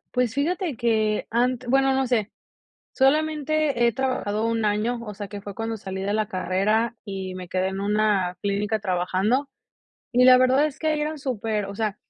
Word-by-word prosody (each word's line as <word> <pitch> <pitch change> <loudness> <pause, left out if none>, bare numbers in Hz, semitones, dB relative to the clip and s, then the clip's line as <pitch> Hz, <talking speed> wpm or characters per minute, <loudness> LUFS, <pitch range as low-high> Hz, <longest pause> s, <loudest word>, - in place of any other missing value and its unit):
Pues, 250 -3 +1
fíjate 320 - -1
que, 220 -2 +1
ant 250 +2 0
bueno, 270 +1 +3
no 265 0 +1
sé. 225 -4 0 0.6
Solamente 300 -2 +2
he - - +3
trabajado 225 -4 -1
1 230 -1 0
año. 215 +4 0
O 210 -3 -7
sea, 205 0 -6
que 205 +1 -8
fue 200 -1 -8
cuando 225 +1 -3
salí 190 -1 -5
de 200 +1 -1
la 215 0 0
carrera, 200 +6 0
y 190 -3 -5
me 185 -1 -7
quedé 185 +1 0
en 190 0 -5
una 200 -3 +1
clínica 205 +2 0
trabajando. 195 +8 0 0.6
Y 250 +1 +5
la 255 0 +9
verdad 255 +3 +4
es 295 - -7
que 315 - -1
ahí 305 -1 +1
eran 305 +1 -2
súper 225 -6 -2
o 200 0 -7
sea, 215 -1 -2
225 Hz, 190 wpm, -24 LUFS, 200-260 Hz, 0.6 s, la